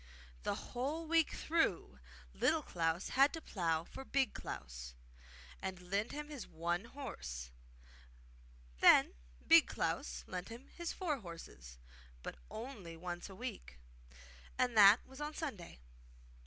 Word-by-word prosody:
The - - -1
whole 290 +7 -3
week 325 -1 +4
through 325 0 0 0.3
Little 320 -2 +2
Klaus 165 -2 -1
had 275 +2 +5
to 325 - -3
plough 165 - 0
for 270 - -9
Big 270 -1 +1
Klaus, 60 -2 -7 0.7
and 190 -1 -4
lend 205 +3 +1
him 295 0 -5
his 280 -6 -6
one 170 +4 -1
horse; 65 - -6 1.3
then - - +7 0.3
Big - - +8
Klaus 60 0 -2
lent 180 +3 -5
him 235 +4 -10
his 345 -1 -4
four 315 -7 -1
horses, 165 - -10 0.5
but - - -6
only 215 -9 -7
once 175 +2 -5
a 190 - -10
week, 215 - -6 0.8
and 250 -2 +2
that 205 +2 +8
was 265 +2 -11
on 300 +1 -3
Sunday. 215 - -5
205 Hz, 130 wpm, -36 LUFS, 165-275 Hz, 1.3 s, Big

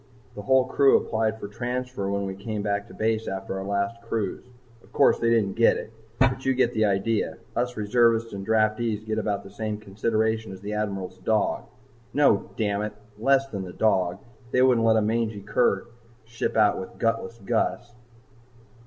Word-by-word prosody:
"The 105 - -7
whole 130 +4 +3
crew 135 +1 +5
applied 110 0 -1
for 100 - -6
transfer 125 -1 -3
when 100 0 -1
we 95 - -4
came 105 +2 -4
back 100 0 -1
to - - -13
base 110 0 0
after 95 0 -4
our - - -4
last 100 +3 -2
cruise. 115 -4 -3 0.4
Of - - -22
course, - - +4
they 115 - +2
didn't 110 -4 +2
get 115 +2 +4
it, 110 - -8 0.2
but 130 0 +2
you 135 0 +1
get 125 -1 +2
the 110 0 +2
idea. 105 +2 0 0.2
Us 125 +1 -1
reservists 115 +1 +2
and 100 -1 -5
draftees 110 0 +1
get 110 0 -1
about 100 -2 -2
the 100 - -12
same 105 +1 -3
consideration 110 +1 -1
as 95 0 -10
the 105 +1 -5
Admiral's 100 -3 -3
dog 110 -2 0 0.5
No! 140 -8 +3
dammit! 105 -1 -1 0.3
Less 135 +3 +3
than 100 -5 -4
the 90 -1 -8
dog. 95 -5 +1 0.3
They 125 +1 +3
wouldn't 120 -3 +4
let 110 0 +5
a 110 - +2
mangy 110 -1 -1
cur 100 -2 +1 0.4
ship 115 0 -3
out 105 -2 +4
with 95 - -8
Gutless 115 0 -1
Gus." 120 +2 -1
110 Hz, 180 wpm, -25 LUFS, 100-115 Hz, 0.5 s, crew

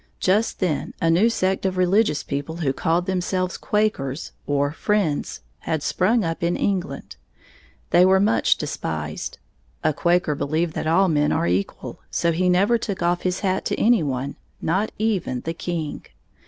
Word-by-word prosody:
Just 205 +5 +1
then 175 -6 -1
a 165 - +2
new 195 +8 +4
sect 190 -4 0
of 190 -1 -1
religious 185 -4 +2
people 140 +3 -4
who 150 -6 -1
called 165 +5 0
themselves 185 0 -1
Quakers, 165 -10 -1 0.2
or 145 0 +1
Friends, 180 -3 -1 0.2
had 160 -2 -2
sprung 215 +5 +2
up 165 0 -3
in 170 +1 +1
England. 190 -2 -2 0.7
They 175 - +6
were 190 +1 +5
much 210 +3 +3
despised. - - -4 0.5
A 155 -1 +2
Quaker 170 0 +2
believed 155 +3 -1
that - - -3
all 185 +4 +4
men 150 -3 +2
are - - +1
equal, 90 +3 -2
so 170 - +1
he 180 +3 +1
never 200 +6 +3
took 200 -4 -4 0.2
his 180 0 -1
hat 190 -2 +1
off - - -5
to - - -1
any 235 -3 +4
one, 135 -1 -3 0.2
not 190 +6 0
even 195 - -1
the 165 - -3
king. 165 -3 -4
175 Hz, 165 wpm, -23 LUFS, 155-190 Hz, 0.7 s, They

